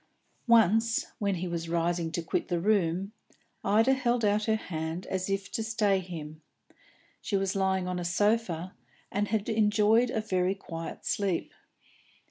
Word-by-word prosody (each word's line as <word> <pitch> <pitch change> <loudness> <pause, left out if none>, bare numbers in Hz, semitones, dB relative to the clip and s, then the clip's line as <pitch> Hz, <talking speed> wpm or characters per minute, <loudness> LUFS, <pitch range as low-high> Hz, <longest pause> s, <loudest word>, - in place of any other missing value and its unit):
Once, 225 0 +4
when 200 -2 0
he 180 +1 -3
was 170 -1 -4
rising 170 0 0
to 170 - -3
quit - - -2
the 175 -3 0
room, 190 -1 +1 0.5
Ida 225 +6 +4
held 245 -3 +1
out 210 +1 +2
her 220 - +2
hand 165 -4 -4
as 190 0 -3
if 195 0 -2
to - - -2
stay 215 -3 +1
him. 160 -4 -8 0.8
She 200 - -1
was 195 0 -1
lying 190 -1 +1
on 180 0 -2
a - - -3
sofa, 185 -1 0 0.4
and 205 +1 0
had 210 -1 -1
enjoyed 220 +2 +3
a 230 - -1
very 185 -3 0
quiet 165 -4 -7
sleep. 195 -4 -1
195 Hz, 155 wpm, -29 LUFS, 175-215 Hz, 0.8 s, Once